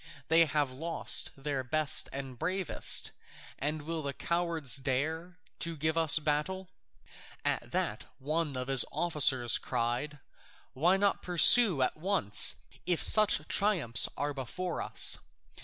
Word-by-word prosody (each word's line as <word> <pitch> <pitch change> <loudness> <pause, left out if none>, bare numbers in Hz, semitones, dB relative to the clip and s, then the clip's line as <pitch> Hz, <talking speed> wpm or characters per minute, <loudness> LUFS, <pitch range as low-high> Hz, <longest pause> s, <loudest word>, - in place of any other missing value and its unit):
They 165 +1 +4
have 145 -3 -2
lost 165 +6 0
their 135 -1 -4
best 150 +3 0
and 135 -2 -9
bravest, 185 +1 0 0.5
and 150 +2 -4
will 165 +1 -5
the 140 -2 -5
cowards 170 -7 -1
dare 155 +6 -4 0.2
to 165 -1 -4
give 160 +2 -2
us 160 -1 +6
battle?" 155 +5 -3 0.8
At - - -3
that - - -3
one 150 +1 -4
of 125 0 -5
his 135 -2 +3
officers 135 -8 +2
cried, 120 +6 -4 0.6
"Why 170 +8 +1
not 200 0 -1
pursue 180 - +5
at 130 - -3
once, 175 - +3 0.3
if 175 -2 0
such 210 -8 +4
triumphs 175 - +1
are 145 +1 -3
before 165 +7 -6
us?" - - +3
155 Hz, 130 wpm, -29 LUFS, 135-170 Hz, 0.8 s, us